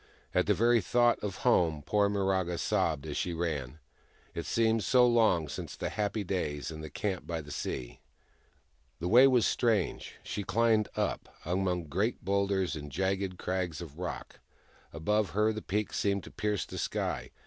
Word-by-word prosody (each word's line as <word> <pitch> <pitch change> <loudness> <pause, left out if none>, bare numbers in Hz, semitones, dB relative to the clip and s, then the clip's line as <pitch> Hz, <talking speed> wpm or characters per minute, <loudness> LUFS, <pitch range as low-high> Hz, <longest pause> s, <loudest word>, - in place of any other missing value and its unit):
At - - +2
the - - +4
very 115 +1 +4
thought 120 +4 +3
of 100 -2 -4
home, 80 -11 +3
poor 105 -1 +2
Miraga 95 -3 0
sobbed 75 -4 0
as - - -4
she 90 -2 -1
ran: 75 -5 -3 0.6
it - - -5
seemed 115 -1 +2
so 125 -1 +5
long 110 -9 +3
since 75 - -6
the - - -3
happy 105 0 -1
days 80 -6 -2
in 80 -1 -7
the 80 - -7
camp 95 +6 -3
by 85 -1 -2
the 75 -2 -9
sea. - - -4 1.0
The 85 - -3
way 125 +8 +8
was 125 -4 +4
strange. 110 - 0
She 105 - -4
climbed 110 +2 +2
up, - - -2 0.2
among 90 0 0
great 95 - -2
boulders 100 -3 +1
and 75 -1 -7
jagged 95 +2 -1
crags 90 -4 -2
of 80 -2 -9
rock. 90 - -6 0.5
Above 105 +5 0
her 110 +1 +3
the 110 - -5
peaks 105 +1 -2
seemed 100 -1 +1
to - - -11
pierce 105 -2 -1
the - - -7
sky. - - -2
95 Hz, 170 wpm, -30 LUFS, 85-105 Hz, 1.0 s, way